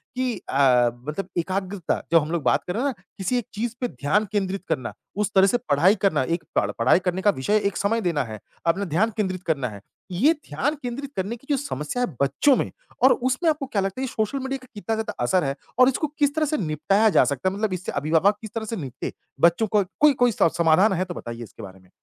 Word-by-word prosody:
कि 255 -1 0 0.2
अ, 125 -3 +4 0.2
मतलब 175 +5 -3
एकाग्रता 185 +1 -2
जब 165 - +7
हम 150 +2 -5
लोग 170 -4 -1
बात - - +2
कर 180 - -2
रहे 235 - -1
हैं 285 - +2
ना 195 -10 -9
किसी 200 +6 0
एक 240 - -2
चीज़ 230 +3 -3
पे 245 - +1
ध्यान 205 +4 0
केंद्रित 195 -2 -1
करना, 145 -6 -2 0.2
उस 210 +1 -1
तरह 190 0 +6
से 245 - +2
पढ़ाई 170 +8 +5
करना, 175 -9 +2
एक 165 +3 -2
पढ़ 100 - +2
पढ़ाई 125 +9 +5
करने 180 +1 0
का 205 - +4
विषय 210 +11 +2
एक 200 - -3
समय 225 +3 +1
देना 170 -7 0
है, 110 -3 -8 0.3
अपना 190 +4 +1
ध्यान 190 +7 +1
केंद्रित 185 -3 -2
करना 140 -6 0
है। 100 -2 -10 0.3
ये 245 - +4 0.2
ध्यान 270 - -1
केंद्रित 260 +3 -5
करने 195 +5 -2
की 245 +4 -19
जो 285 - +2
समस्या 245 - -3
है - - +1
बच्चों 140 - +4
में - - -1 0.3
और 260 - +8
उसमें 260 +7 0
आपको 300 -3 -1
क्या 210 -7 -1
लगता 195 +6 -3
है - - -1
ये - - -7
सोशल 220 +5 -1
मीडिया 265 +1 -3
का - - -14
कितना 220 +1 -3
ज़्यादा 220 0 -3
असर 180 +7 +2
है 135 0 -1 0.2
और 255 0 +7
इसको 290 +4 -1
किस 285 -1 +2
तरह 315 -1 +2
से 305 +1 -1
निपटाया 185 - +2
जा - - +5
सकता 140 +6 0
है, 195 - -6
मतलब 210 -2 -1
इससे 185 0 -4
अभिभावक 160 +8 +2
किस 220 -2 -9
तरह 225 - -2
से 225 - -4
निपटे? 135 - -5 0.3
बच्चों 170 +8 +4
को 210 0 +2 0.2
कोई 300 -1 +6
कोई 245 - +5
स 165 - +6
समाधान 170 +5 +4
है 185 +1 0
तो 175 - -6
बताइए 120 -6 -7
इसके 110 - -12
बारे 95 -1 -10
में। 90 -1 -24
195 Hz, 250 wpm, -24 LUFS, 155-230 Hz, 0.3 s, और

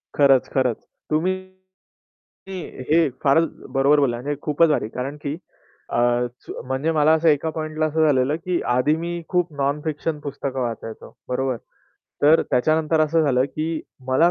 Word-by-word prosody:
खरंच, 135 -3 +4
खरंच. 130 -3 +2 0.3
तुम्ही 160 +5 +1 1.6
हे 160 -2 +4
फारच 160 +4 +4 0.2
बरोबर 140 +2 +4
बोलला 125 -4 +1
म्हणजे 145 +2 -2
खूपच 155 +2 +3
भारी. 150 -7 +1
कारण 135 +5 -5
की 145 +2 -3 0.5
अ, 120 0 +2
सु - - -8
म्हणजे 135 +5 0
मला 155 -1 +4
असं 160 +1 +2
एका 150 +2 +2
पॉइंटला 155 0 -2
असं 155 +1 +2
झालेलं 135 +1 +2
की 175 +1 -2
आधी 135 +5 +3
मी 170 +1 -4 0.2
खूप 180 -2 +1
नॉन-फिक्शन 150 +2 -2
पुस्तकं 140 -2 -4
वाचायचो. 115 -2 -5 0.2
बरोबर. 130 -1 -1 0.7
तर 155 +3 +6
त्याच्यानंतर 155 +4 +2
असं 160 +1 +3
झालं, 130 -3 +3
की 155 +3 -3 0.3
मला 160 +7 +4
150 Hz, 145 wpm, -22 LUFS, 130-160 Hz, 1.6 s, तर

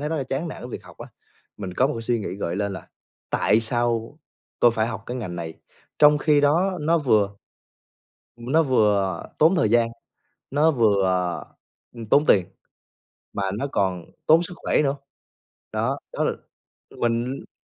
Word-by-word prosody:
thấy 150 - -2
rất 160 - -2
là 145 - -1
chán 135 +6 -3
nản - - -8
với 125 - -7
việc - - -8
học - - -15
á, - - -9 0.5
mình 95 -3 -6
có 130 - +3
một 145 - -2
cái 115 - -5
suy 115 0 0
nghĩ 95 - -4
gợi 90 -2 -3
lên 100 -1 -1
là 95 - -9 0.4
"tại 110 - +3
sao 120 +3 -1 0.4
tôi 120 - +6
phải 110 -1 0
học 110 -1 -5
cái 125 - -4
ngành 95 -8 -5
này?" 80 -1 -5 0.4
Trong 150 0 +6
khi 150 -1 +3
đó 175 +6 +2
nó 165 +3 +2
vừa 105 -8 +2 1.0
ưm, 120 +3 -7
nó 160 +1 +5
vừa 105 - +2
tốn 160 +5 +5
thời 110 - +2
gian, 115 0 +3 0.6
nó 150 +4 +3
vừa, 105 -8 +3
ờ, 90 -1 0 0.5
ừm, 115 -2 -8
tốn 145 +7 +4
tiền, 95 -3 +4 0.9
mà 100 - -2 0.2
nó 140 - -1
còn 90 -3 -1 0.2
tốn 165 +2 +6
sức 180 - -5
khỏe - - +1
nữa. 140 0 +1 0.8
Đó, - - -1
đó - - -1
l - - +2 0.7
mình 120 +3 -1
120 Hz, 185 wpm, -24 LUFS, 100-145 Hz, 1.0 s, tôi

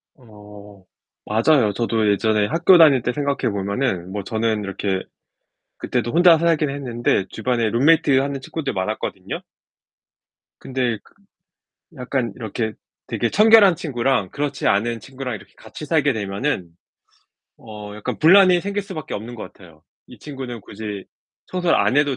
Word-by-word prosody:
어. 105 -5 -15 0.4
맞아요. 115 0 +2
저도 110 -1 +1
예전에 105 0 +1
학교 170 - +5
다닐 150 -6 +6
때 120 - -1
생각해 140 -4 -1
보면은 100 -2 -2
뭐 100 0 -4
저는 110 +1 -1
이렇게 95 -1 -2 0.8
그때도 120 -2 -2
혼자 170 0 +6
살긴 160 -2 +1
했는데 120 -7 -1
주변에 120 -3 -1
룸메이트 140 +3 +3
하는 140 0 -2
친구들 140 +2 -5
많았거든요. 95 -1 -4 1.2
근데 125 -3 -2
그 - - -24 0.8
약간 125 -3 -2
이렇게 110 -1 -4 0.3
되게 120 - -2
청결한 215 -3 +6
친구랑 130 - -1
그렇지 145 -1 -3
않은 115 +3 0
친구랑 130 -1 -6
이렇게 - - -17
같이 150 - -10
살게 145 -2 +2
되면은 100 - -3 0.9
어 105 -2 -10
약간 105 - -5
분란이 180 +2 +6
생길 200 +2 -3
수밖에 180 -7 -7
없는 115 +4 -6
것 105 -5 -9
같아요. 80 -5 -18 0.2
이 - - -14
친구는 130 -5 -7
굳이 105 -2 -7 0.4
청소를 180 -2 +1
안 130 - +2
해도 145 -2 +2
120 Hz, 315 characters per minute, -21 LUFS, 105-145 Hz, 1.2 s, 다닐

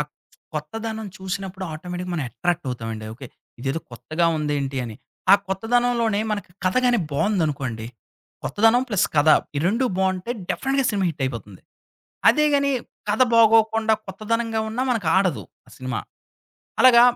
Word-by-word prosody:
అ - - +3 0.5
కొత్తదనం 225 -1 -4
చూసినప్పుడు 190 0 -5
ఆటోమేటిక్‌గా 180 +3 -5
మనం 155 -5 -1
అట్రాక్ట్ 175 +5 -1
అవుతామండి. 115 -3 -5
ఓకే. 130 +3 -9 0.3
ఇదేదో 135 +5 -2
కొత్తగా 155 +8 -1
ఉంది 150 -1 -1
ఏంటి 135 -1 -3
అని. 110 -2 -7 0.4
ఆ - - +12
కొత్తదనంలోనే 230 +1 +1
మనకి 205 -3 -3
కథ 185 - +2
గాని 245 -2 +4
బావుందనుకోండి, 140 - -1 0.6
కొత్తదనం 225 +4 +3
ప్లస్ 205 -6 +2
కథ, 145 +1 +4 0.3
ఈ - - +2
2 230 +7 +2
బావుంటే 190 +2 0 0.2
డెఫ్‌నెట్‌గా 270 0 0
సినిమా 200 -3 0
హిటయిపోతుంది. 120 - -5 0.7
అదేగాని 290 -2 +4 0.4
కథ 215 +5 +3
బాగోకుండా 220 0 +5
కొత్తదనంగా 225 +3 -1
ఉన్నా 230 +4 -2
మనకు 225 -8 0
ఆడదు 185 -6 +2 0.3
ఆ - - -18
సినిమా. 130 -1 -3 0.8
అలాగా 245 -2 +8
190 Hz, 135 wpm, -23 LUFS, 150-225 Hz, 0.8 s, ఆ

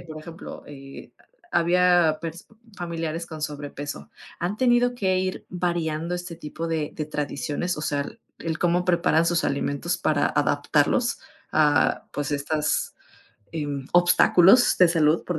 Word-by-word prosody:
por 155 -2 -9
ejemplo, 165 +2 -10
eh, 135 -1 -11 0.4
ha - - +4
había 175 -2 +3
pers 165 +1 -7 0.3
familiares 165 -1 -4
con 155 -2 -8
sobrepeso, 145 -1 -6 0.3
¿han 180 +4 -2
tenido 245 0 +3
que 190 -5 +1
ir 185 0 -3
variando 170 -2 -2
este 175 -1 -6
tipo 165 +1 -6
de 160 -2 -2
de 155 - -3
tradiciones, 150 +3 -3
o 150 - -5
sea, 145 -2 0
el - - -11 0.2
el 160 -1 -3
cómo 175 +1 +1
preparan 170 -2 +3
sus 170 0 +1
alimentos 145 +5 -1
para 145 -2 +1
adaptarlos, 145 - +1 0.3
ah, 150 -3 +2
pues, 145 +1 -3
estas, 150 +2 -1 0.6
em, 145 -4 -4
obstáculos 175 +5 +5
de 180 - +7
salud, 165 -1 +2
por 175 -2 -3
165 Hz, 145 wpm, -24 LUFS, 150-175 Hz, 0.6 s, de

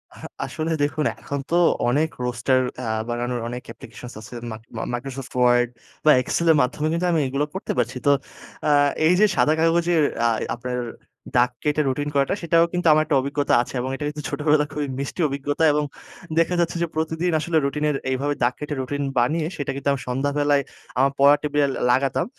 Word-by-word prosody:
আহ - - -11 0.2
আসলে 160 +1 -3
দেখুন 150 +1 0
এখন 140 - -4
তো 170 - +1 0.3
অনেক 150 +6 +2
roaster 125 +2 +1 0.2
আ - - -5 0.2
বানানোর 120 +1 -2
অনেক 125 +1 -5
applications 125 - -11
আছে। 110 - -12 0.2
মাইক 110 0 -7 0.3
Microsoft 130 +1 -6
Word 120 0 +4 0.4
বা 155 - +8
Excel 170 +6 -1
এর 160 - +4
মাধ্যমে 150 +5 -1
কিন্তু 175 +2 0
আমি 165 - +2
এগুলো 140 +3 -1
করতে 190 - -4
পারছি। - - 0
তো 145 - +7 0.6
আ - - +3 0.4
এই 170 - +5
যে 215 - +7
সাদা 155 - +3
কাগজের 165 0 +3 0.2
আ - - +4 0.3
আপনার 125 +1 -4 0.6
দাগ 125 +1 +4
কেটে 150 0 +1
routine 145 +3 -2
করাটা 140 +5 +2
সেটাও 165 0 +4
কিন্তু 175 -1 0
আমার 155 0 +4
একটা 150 -2 +1
অভিজ্ঞতা 140 +1 -1
আছে 125 - -7
এবং 130 - -3
এটা 145 - -5
কিন্তু 150 0 -6
ছোটবেলায় 150 -1 +1
খুবই 150 -1 -2
মিষ্টি 140 +5 -4
অভিজ্ঞতা 145 +2 -2
এবং 150 0 +1 0.6
দেখা 165 +2 +2
যাচ্ছে 170 0 0
যে 170 - +1
প্রতিদিন 160 +2 -1
আসলে 165 +1 0
routine 150 +2 -1
এর 145 - 0 0.2
এইভাবে 140 +3 0
দাগ 120 +1 +3
কেটে 150 0 -4
রুটিন 145 +2 -3 0.2
বানিয়ে 155 +6 +1
সেটা 145 - -2
কিন্তু 140 +1 -1 0.2
সন্ধ্যাবেলায় 145 +2 +1 0.3
আমার 135 +1 +3
পড়া 140 +1 +7
টেবিলে 145 -1 +1
ল - - -4
লাগাতাম 135 +1 +1
145 Hz, 190 wpm, -23 LUFS, 130-155 Hz, 0.6 s, বা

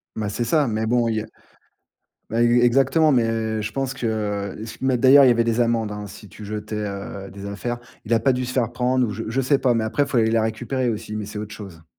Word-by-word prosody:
Ben, 105 -2 -2
c'est 120 +4 -2
ça. 145 +3 +2
Mais 110 0 -1
bon, 120 0 +2
il 110 - 0
y - - 0
a - - -7 1.1
ben 115 +1 0
e 120 +1 +4
exactement. 135 +5 +4
Mais 115 -2 0
je 110 - -4
pense 135 -1 -2
que 105 -5 -2 0.2
mais 130 -2 +1
d'ailleurs, 135 +2 +7
il - - +6
y - - +6
avait 115 -1 +3
des 115 +1 0
amendes, 115 -3 +1
hein, 105 0 -6
si 105 +1 -12
tu 105 - -11
jetais, 105 +1 -5
heu, 100 -1 -5
des 100 0 -9
affaires. 120 +5 -4 0.3
Il 110 - -4
a 115 - +2
pas 135 - +3
dû 125 0 -2
se 125 - -5
faire 120 -2 0
prendre, 125 +1 +1
ou - - -4
je 110 +2 -5
je 130 +4 0
sais 135 +2 +2
pas. 125 -2 +2
Mais 110 -1 0
après, 125 +6 0
il - - -10
faut 125 - -2
aller 110 0 +3
la 115 -1 +2
récupérer 120 +3 -2
aussi. 110 -1 -4
Mais 105 -2 -4
c'est 105 0 -7
autre 105 0 -6
chose. 85 -6 -11
115 Hz, 265 wpm, -22 LUFS, 105-125 Hz, 1.1 s, d'ailleurs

